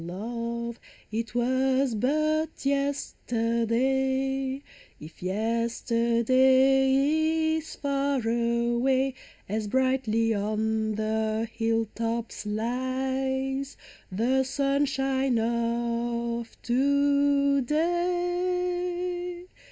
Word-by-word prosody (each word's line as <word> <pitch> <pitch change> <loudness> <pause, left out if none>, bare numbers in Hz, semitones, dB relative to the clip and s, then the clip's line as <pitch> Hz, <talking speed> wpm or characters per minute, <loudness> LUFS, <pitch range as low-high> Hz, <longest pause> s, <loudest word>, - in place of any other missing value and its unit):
O - - -8
love, 235 +5 -4 0.3
it 230 +2 -3
was 260 +1 +2
but 310 +7 0
yesterday! 265 0 0 0.4
If 155 +2 -12
yesterday 260 - +2
is 320 0 -7
far 280 -1 0
away. 235 +3 +1 0.3
As 215 +1 -2
brightly 240 -2 +1
on 215 +1 -1
the 220 +1 -1
hill 225 0 +1
tops 230 -1 -3
lies 265 +4 -2 0.3
The 245 +7 +2
sunshine 270 -1 0
of 235 0 -1
to 280 +2 +3
day. 355 +3 -1
260 Hz, 70 wpm, -27 LUFS, 230-280 Hz, 0.4 s, to